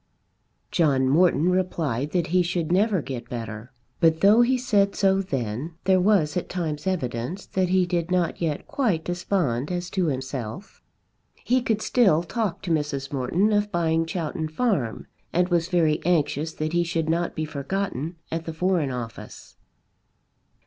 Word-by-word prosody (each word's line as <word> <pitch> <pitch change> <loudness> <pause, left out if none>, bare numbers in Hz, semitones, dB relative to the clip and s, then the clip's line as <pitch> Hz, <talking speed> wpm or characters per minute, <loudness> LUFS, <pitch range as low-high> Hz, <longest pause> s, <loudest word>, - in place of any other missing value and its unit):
John 140 -6 +2
Morton 170 +3 +3
replied 160 -8 -1
that 175 0 0
he 185 - +5
should 170 -2 -1
never 195 -2 +2
get 120 -3 -6
better; 115 0 -6 0.3
but 160 -1 +3
though 210 +4 +6
he 255 +2 +3
said 205 -6 +2
so 195 -1 +3
then, 135 - -4
there 190 0 +4
was 180 -7 +3
at 180 - -2
times 160 -3 -3
evidence 160 0 -2
that 185 -1 -1
he 185 0 +3
did 175 -1 -1
not 180 -2 0
yet 155 -4 -1
quite 205 - 0
despond 175 -7 -1
as 175 0 -3
to 185 -3 0
himself. 130 - -5 0.6
He 255 +1 +2
could 220 -3 -1
still 190 -10 +3
talk 210 +1 -3
to 175 - -3
Mrs. 145 -3 -1
Morton 165 +11 +1
of 205 0 +1
buying 165 -2 +1
Chowton 160 -2 -3
Farm, 155 - -1 0.3
and 180 +1 +1
was 170 -2 +1
very 165 -4 +1
anxious 155 -2 +1
that 155 +1 -3
he 175 0 +3
should 165 -2 -2
not 170 +2 0
be 155 - -2
forgotten 155 +1 -3 0.2
at 165 0 -3
the 165 - -5
Foreign 175 -3 +1
Office. 120 -3 -8
170 Hz, 160 wpm, -25 LUFS, 145-185 Hz, 0.6 s, though